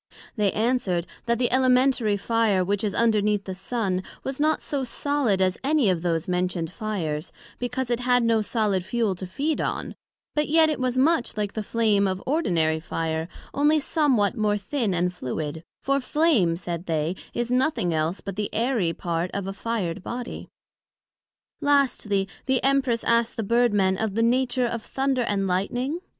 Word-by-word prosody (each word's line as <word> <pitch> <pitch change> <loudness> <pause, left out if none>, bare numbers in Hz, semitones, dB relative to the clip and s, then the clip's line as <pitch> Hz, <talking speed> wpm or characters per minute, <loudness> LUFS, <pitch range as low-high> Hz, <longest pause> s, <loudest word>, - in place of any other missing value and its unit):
They 210 -4 +2
answered, 215 -7 0 0.2
That 235 0 +2
the 245 0 +1
Elementary 255 -4 +3
Fire, 210 -3 +1
which 205 +3 -1
is 205 -1 -1
underneath 210 -3 +2
the 190 - -5
Sun, 195 -1 -1 0.2
was 270 +1 -4
not 310 +1 +2
so 280 -2 -3
solid 255 -5 0
as 185 0 0
any 275 -7 +3
of 175 -3 -1
those 165 -1 -1
mentioned 180 -2 -1
fires; 175 -9 -3 0.3
because 245 0 -2
it 240 - +1
had 245 0 +3
no 230 -1 +3
solid 210 -4 0
fuel 225 0 0
to 185 +1 -7
feed 290 - -1
on; - - -3 0.4
but 300 0 0
yet 315 0 +5
it 300 - -3
was 255 0 -1
much 265 -4 +2
like 205 -1 -2
the 220 - -2
flame 210 -2 +2
of 190 0 -3
ordinary 170 - +1
fire, 160 0 -3 0.3
onely 295 +2 +3
somewhat 270 - +2
more 210 -2 +1
thin 210 -1 -1
and 180 +1 0
fluid; 155 +1 -4 0.2
for 275 0 +2
Flame, 255 - +2
said 170 0 -5
they, 160 +1 0 0.2
is 240 0 -1
nothing 250 - +1
else 160 +4 -1
but 195 - -6
the 210 0 -2
airy 225 -7 0
part 170 +1 -2
of 200 -1 -2
a 195 - -4
fired 195 -6 -3
Body. 240 +5 -6 1.1
Lastly, 260 -9 +2 0.2
the 260 -1 +1
Empress 265 -4 +2
asked 235 0 +1
the 225 - -1
Bird 235 +3 +3
men 190 -2 +2
of 220 -3 -2
the 225 - +2
nature 250 +1 +2
of 235 -1 -2
Thunder 270 +1 -1
and 205 -4 0
Lightning? 245 - -1
220 Hz, 175 wpm, -25 LUFS, 185-255 Hz, 1.1 s, yet